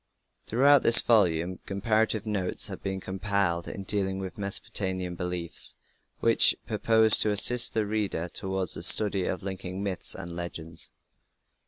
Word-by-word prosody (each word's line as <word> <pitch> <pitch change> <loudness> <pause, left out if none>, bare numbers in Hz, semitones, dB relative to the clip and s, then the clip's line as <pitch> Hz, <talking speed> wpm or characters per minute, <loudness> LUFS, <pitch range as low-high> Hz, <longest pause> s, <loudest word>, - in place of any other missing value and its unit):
Throughout 140 +4 +3
this 115 - +8
volume 90 -5 +1
comparative 110 +2 -1
notes 100 -4 -2
have - - -9
been 95 0 -5
compiled 95 -2 -3
in 100 - -7
dealing 95 -1 0
with 95 -3 -7
Mesopotamian 95 -3 -2
beliefs 90 -1 -2 0.5
with - - +4
purpose 110 -1 +3
to 110 - +2
assist 120 +4 +6
the 110 -1 0
reader 100 -5 -3
towards 95 0 -3
the - - -4
study 100 -3 +2
of 95 - -4
linking 95 0 -6
myths 95 -3 -1
and 85 - -9
legends. 85 -2 -6
95 Hz, 140 wpm, -26 LUFS, 90-105 Hz, 0.5 s, this